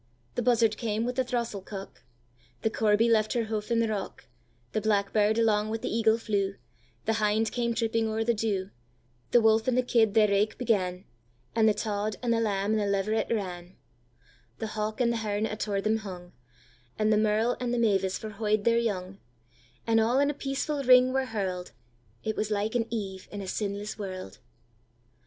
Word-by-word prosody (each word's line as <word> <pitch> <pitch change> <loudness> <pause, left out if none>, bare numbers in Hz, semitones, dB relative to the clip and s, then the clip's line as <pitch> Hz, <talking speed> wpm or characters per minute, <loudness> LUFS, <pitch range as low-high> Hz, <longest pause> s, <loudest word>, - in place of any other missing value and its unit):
The - - -1
buzzard 230 -3 +3
came 225 -1 -1
with 250 0 -2
the 260 - +2
throstle 235 -5 -2
cock; 195 0 -9 0.6
The 220 - +1
corby 220 +1 +3
left 220 -2 +3
her 235 -2 0
houf 215 0 -3
in 230 -1 +2
the 230 - +1
rock; 205 -8 -4 0.5
The 215 - -1
blackbird 210 0 +2
alang 215 -2 +2
wi' 225 - -1
the 220 - -3
eagle 225 -1 +3
flew; 200 -3 -1 0.5
The 225 - +2
hind 215 +1 +2
came 235 -1 -1
tripping 225 -1 0
o'er 220 0 -1
the 235 +1 +2
dew; 205 -3 -2 0.6
The 240 - +5
wolf 220 +1 +3
and 255 -1 +2
the 255 - +3
kid 225 -4 +2
their 215 -1 +6
raike 205 +1 +1
began, 190 -6 0 0.5
And 220 -1 +5
the 210 - +2
tod, 210 0 -2
and 235 -1 +2
the 230 - +1
lamb, 205 -2 0
and 220 - +2
the 205 - 0
leveret 200 +2 0
ran; 180 -4 -4 0.8
The 220 -1 -5
hawk 215 +3 -2
and 235 -1 +3
the - - -1
hern 210 -1 -1
attour 210 -2 -2
them 215 +2 +1
hung, 180 -4 -8 0.7
And 215 0 +2
the - - +3
merle 220 +3 +2
and 245 -1 -2
the 245 - 0
mavis 195 -5 +2
forhooy'd 215 -1 -1
their 235 +1 +3
young; 195 -4 -3 0.7
And 225 -1 +3
all 230 +3 +2
in 285 +1 +3
a - - -6
peaceful 280 +1 -2
ring 255 0 +6
were 265 0 +1
hurl'd; 185 - -4 0.5
It 220 - -2
was 215 - -1
like 210 +1 -1
an 235 -2 0
Eve 195 -5 -4
in 205 - -6
a 195 - -6
sinless 205 +2 -3
world! 185 -6 -6
215 Hz, 190 wpm, -28 LUFS, 205-230 Hz, 0.8 s, their